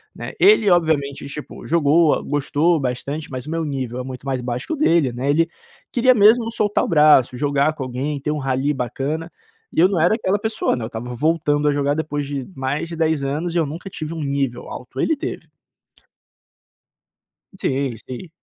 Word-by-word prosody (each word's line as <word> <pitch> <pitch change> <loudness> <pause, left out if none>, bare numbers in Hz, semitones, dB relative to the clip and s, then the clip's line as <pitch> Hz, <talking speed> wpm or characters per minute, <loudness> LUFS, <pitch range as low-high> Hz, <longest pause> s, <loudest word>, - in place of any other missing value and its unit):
né? - - -7
Ele 390 - +6
obviamente, 145 -5 +1
tipo, 145 +1 -8
jogou 160 0 +3
gostou 145 +3 +1
bastante 140 +4 -3
mas 130 -1 -5
o - - -5
meu 165 0 -1
nível 130 -4 -3
é - - -3
muito 130 0 -8
mais 135 -2 -1
baixo 125 +1 -4
que - - -2
o - - 0
dele, 170 - +3
né, 130 +3 -2
ele 165 +3 +3 0.4
queria 255 +1 +4
mesmo 225 +2 +5
soltar 210 -2 +1
o - - -4
braço, 150 -6 +5
jogar 145 +2 +1
com 140 - -4
alguém, 135 +3 -3
ter 150 - -1
um 150 - -2
rally 135 +1 0
bacana 140 +6 -3 0.4
e - - 0
eu 180 - +7
não 190 -4 0
era 175 +6 +4
aquela 205 -3 0
pessoa, 220 -8 0
né, 120 - -5
eu - - -4
estava 115 +2 -6
voltando 150 +1 +1
a - - +4
jogar 145 0 +1
depois 150 -2 -2
de 140 -2 -4
mais 135 +4 -2
de 170 - -5
10 160 -3 +1
anos 155 +5 -2
e - - +2
eu 165 - +2
nunca 165 +7 -7
tive 155 -1 -5
um 160 - -4
nível 140 -3 -2
alto, 125 +1 -8
ele 320 - +2
teve. - - -6 2.1
Sim. 135 -5 -1
Sim. 130 +8 -7
145 Hz, 200 wpm, -21 LUFS, 135-165 Hz, 2.1 s, eu